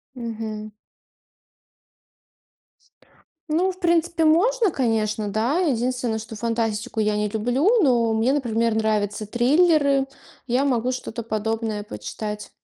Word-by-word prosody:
Мгм. 220 Hz, -3 st, -6 dB, 2.8 s
Ну, 355 Hz, +5 st, +2 dB
в 365 Hz, -, -20 dB
принципе, 340 Hz, -1 st, +1 dB
можно, 395 Hz, +7 st, +3 dB
конечно, 220 Hz, -5 st, 0 dB
да. 225 Hz, -, 0 dB
Единственное, 250 Hz, -7 st, 0 dB
что 220 Hz, +1 st, -8 dB
фантастику 225 Hz, -1 st, -2 dB
я 210 Hz, 0 st, +1 dB
не 210 Hz, 0 st, 0 dB
люблю, 245 Hz, -, +1 dB
но 235 Hz, -5 st, +3 dB
мне, 225 Hz, +4 st, +2 dB
например, 230 Hz, -5 st, 0 dB
нравятся 215 Hz, -1 st, 0 dB
триллеры. 280 Hz, -, +3 dB, 0.4 s
Я 250 Hz, +3 st, +2 dB
могу 250 Hz, -2 st, +1 dB
что-то 240 Hz, -2 st, -5 dB
подобное 220 Hz, -1 st, -2 dB
почитать. 210 Hz, -1 st, -6 dB
230 Hz, 110 wpm, -23 LUFS, 220-280 Hz, 2.8 s, можно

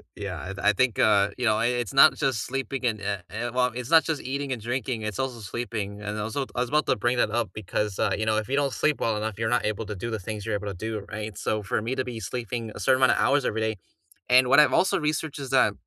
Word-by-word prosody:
Yeah, 95 Hz, -5 st, -5 dB
I -, -, -7 dB
th 100 Hz, +1 st, -6 dB
I 105 Hz, -, +5 dB
think, 120 Hz, 0 st, +1 dB
uh, 100 Hz, -2 st, +4 dB
you 125 Hz, -, -2 dB
know, 110 Hz, -, +4 dB
i 115 Hz, -, +2 dB
it's 120 Hz, 0 st, -2 dB
not 140 Hz, +3 st, +7 dB
just 125 Hz, -7 st, 0 dB
sleeping 135 Hz, 0 st, -4 dB
and, 110 Hz, -3 st, 0 dB
eh 100 Hz, -1 st, -2 dB
eh 115 Hz, +3 st, -3 dB
well, 125 Hz, 0 st, +2 dB
it's 125 Hz, -1 st, -5 dB
not 165 Hz, -1 st, +7 dB
just 160 Hz, -3 st, -2 dB
eating 140 Hz, +1 st, -3 dB
and 120 Hz, -, -6 dB
drinking, 120 Hz, -1 st, -3 dB
it's 105 Hz, -3 st, -4 dB
also 130 Hz, -3 st, -2 dB
sleeping, 105 Hz, -2 st, -5 dB
and 105 Hz, +1 st, -4 dB
also, 110 Hz, +6 st, -2 dB
t -, -, -19 dB
I 120 Hz, -, -1 dB
was 125 Hz, -, 0 dB
about 150 Hz, +1 st, +1 dB
to -, -, +2 dB
bring 120 Hz, +4 st, +1 dB
that 105 Hz, -, -2 dB
up, 120 Hz, 0 st, 0 dB
because, 105 Hz, 0 st, -3 dB
uh, -, -, +2 dB
you 110 Hz, -, 0 dB
know, 110 Hz, -, +3 dB
if 110 Hz, +2 st, -3 dB
you 140 Hz, -, +1 dB
don't 140 Hz, -2 st, 0 dB
sleep 150 Hz, -2 st, +1 dB
well 110 Hz, -1 st, +1 dB
enough, 110 Hz, -1 st, -3 dB
you're 115 Hz, +1 st, 0 dB
not -, -, -4 dB
able 110 Hz, +1 st, -2 dB
to 105 Hz, -, -5 dB
do 115 Hz, +6 st, -5 dB
the 110 Hz, -, -2 dB
things 105 Hz, +1 st, -6 dB
you're 105 Hz, -2 st, -1 dB
able 105 Hz, -, -6 dB
to 90 Hz, -, -13 dB
do, 105 Hz, -3 st, -4 dB
right? 105 Hz, -2 st, -5 dB
So 110 Hz, -1 st, -1 dB
for 100 Hz, -, -1 dB
me 120 Hz, +4 st, -2 dB
to 130 Hz, -, +1 dB
be 120 Hz, -3 st, -5 dB
sleeping 115 Hz, +3 st, -4 dB
a -, -, -7 dB
certain 130 Hz, +7 st, +3 dB
amount 130 Hz, -, +5 dB
of -, -, +2 dB
hours 140 Hz, -1 st, +2 dB
every 110 Hz, -, -1 dB
day 110 Hz, -, -2 dB, 0.5 s
and 125 Hz, 0 st, +6 dB
what -, -, +7 dB
I've 140 Hz, -4 st, +3 dB
also 190 Hz, -, +2 dB
researched 150 Hz, -1 st, -2 dB
is 135 Hz, -2 st, -6 dB
that, -, -, +4 dB
115 Hz, 295 wpm, -26 LUFS, 105-130 Hz, 0.5 s, not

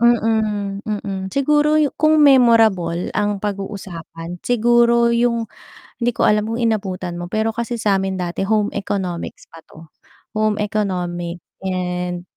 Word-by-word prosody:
mm, 220 Hz, -4 st, +1 dB
mm. 200 Hz, -2 st, -3 dB
Siguro 295 Hz, +5 st, +2 dB, 0.2 s
kung 310 Hz, +1 st, +5 dB
memorable 225 Hz, -10 st, +4 dB
ang 205 Hz, -1 st, 0 dB
pag-uusapan 190 Hz, -4 st, -6 dB
siguro 235 Hz, 0 st, +3 dB
yung 235 Hz, -1 st, +1 dB, 0.6 s
hindi 240 Hz, -, +3 dB
ko -, -, -1 dB
alam 210 Hz, 0 st, +3 dB
kung 230 Hz, +2 st, -3 dB
inabutan 185 Hz, -6 st, -2 dB
mo, 175 Hz, -, -5 dB
pero 220 Hz, +2 st, 0 dB
kasi 235 Hz, +2 st, -3 dB
sa'min 195 Hz, -3 st, 0 dB
dati 180 Hz, +2 st, -2 dB
Home 210 Hz, 0 st, +1 dB
Economics 190 Hz, -4 st, -4 dB
pa 165 Hz, -, -13 dB
'to, 160 Hz, 0 st, -15 dB, 0.5 s
Home 215 Hz, -1 st, +2 dB
Economic 180 Hz, -5 st, -3 dB, 0.2 s
and 180 Hz, -1 st, -2 dB
205 Hz, 125 wpm, -20 LUFS, 180-230 Hz, 0.6 s, kung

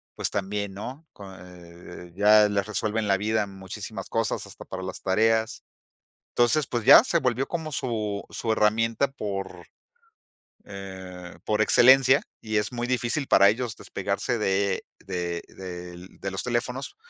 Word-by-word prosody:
pues -, -, -2 dB
también, 100 Hz, 0 st, -3 dB
¿no?, 130 Hz, +10 st, -8 dB
con, 95 Hz, -2 st, -11 dB
eh 90 Hz, -1 st, -13 dB
ya 105 Hz, +1 st, +6 dB
les 100 Hz, -1 st, -1 dB
resuelven 105 Hz, +1 st, -2 dB
la 100 Hz, -1 st, +2 dB
vida, 105 Hz, +1 st, 0 dB
muchísimas 95 Hz, +1 st, -8 dB
cosas, 115 Hz, -1 st, -1 dB
hasta -, -, -11 dB
para 95 Hz, -, -7 dB
las 95 Hz, 0 st, -6 dB
tareas, 110 Hz, +3 st, +1 dB, 0.7 s
entonces, 120 Hz, +5 st, +2 dB
pues 120 Hz, -3 st, -3 dB
ya -, -, +10 dB
se -, -, +1 dB
volvió 125 Hz, +1 st, 0 dB
como 160 Hz, -3 st, -4 dB
su 110 Hz, -6 st, -2 dB
su 115 Hz, -, -2 dB
herramienta 115 Hz, +5 st, +2 dB
por, 100 Hz, -6 st, -6 dB, 1.0 s
eh 95 Hz, -3 st, -9 dB
por 105 Hz, 0 st, +1 dB
excelencia 130 Hz, +4 st, +6 dB, 0.2 s
y 110 Hz, -1 st, -2 dB
es 105 Hz, +1 st, 0 dB
muy 120 Hz, 0 st, -3 dB
difícil 125 Hz, +3 st, -1 dB
para 100 Hz, 0 st, +6 dB
ellos 115 Hz, 0 st, -2 dB
despegarse 120 Hz, -2 st, -3 dB
de 100 Hz, -1 st, 0 dB
de 85 Hz, -2 st, -4 dB
del 90 Hz, -1 st, -10 dB
de 95 Hz, -, -4 dB
los 95 Hz, -, -3 dB
teléfonos, 125 Hz, -, -3 dB
105 Hz, 145 wpm, -26 LUFS, 95-120 Hz, 1.0 s, ya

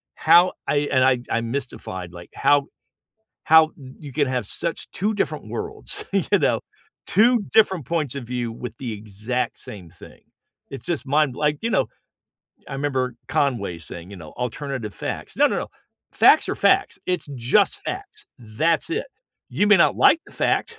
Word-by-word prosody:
how 170 Hz, +3 st, +5 dB
I -, -, +1 dB, 0.2 s
and 130 Hz, -1 st, +4 dB
I 130 Hz, -2 st, +3 dB
I'm 115 Hz, 0 st, -1 dB
mystified, 95 Hz, -9 st, -5 dB
like, 85 Hz, 0 st, -11 dB
how 145 Hz, -1 st, +3 dB, 0.8 s
how 160 Hz, 0 st, +6 dB
y 130 Hz, -3 st, -12 dB
you 140 Hz, -4 st, -10 dB
can 145 Hz, -3 st, +1 dB
have 125 Hz, -1 st, -1 dB
such 170 Hz, -1 st, -4 dB
2 210 Hz, +3 st, -1 dB
different 200 Hz, -, -2 dB
worlds, 430 Hz, 0 st, -4 dB
you -, -, +2 dB
know? -, -, +2 dB, 0.5 s
2 235 Hz, +1 st, +4 dB
different 190 Hz, -, +4 dB
points 155 Hz, -6 st, -2 dB
of 140 Hz, -, -5 dB
view 120 Hz, -1 st, -3 dB
with 115 Hz, 0 st, -7 dB
the 125 Hz, -4 st, -5 dB
exact 105 Hz, +4 st, -3 dB
same 95 Hz, -5 st, -10 dB
thing. 90 Hz, -, -15 dB, 0.5 s
It's 135 Hz, -4 st, -7 dB
just 170 Hz, -5 st, -2 dB
mind 145 Hz, -2 st, +2 dB
like, 150 Hz, 0 st, 0 dB
you 230 Hz, -, -1 dB
know? -, -, +1 dB, 0.8 s
I -, -, -8 dB
remember 130 Hz, -3 st, -1 dB
Conway 120 Hz, -11 st, 0 dB
saying, 85 Hz, +3 st, -8 dB
you 100 Hz, -, -9 dB
know, 80 Hz, -3 st, -11 dB
"alternative 125 Hz, -, -4 dB
facts." -, -, -6 dB
No, -, -, +5 dB
no, -, -, -1 dB
no. -, -, -4 dB, 0.4 s
Facts -, -, +5 dB
are -, -, 0 dB
facts. -, -, +2 dB
It's 180 Hz, -4 st, -2 dB
just 120 Hz, 0 st, +2 dB
facts. -, -, -7 dB
That's 125 Hz, -, 0 dB
it. 430 Hz, +8 st, -2 dB, 0.4 s
You 205 Hz, -, +1 dB
may 210 Hz, -, +7 dB
not 170 Hz, -, +4 dB
like 325 Hz, -, +5 dB
the -, -, -15 dB
fact, 460 Hz, -, -1 dB
135 Hz, 175 wpm, -23 LUFS, 115-165 Hz, 0.8 s, may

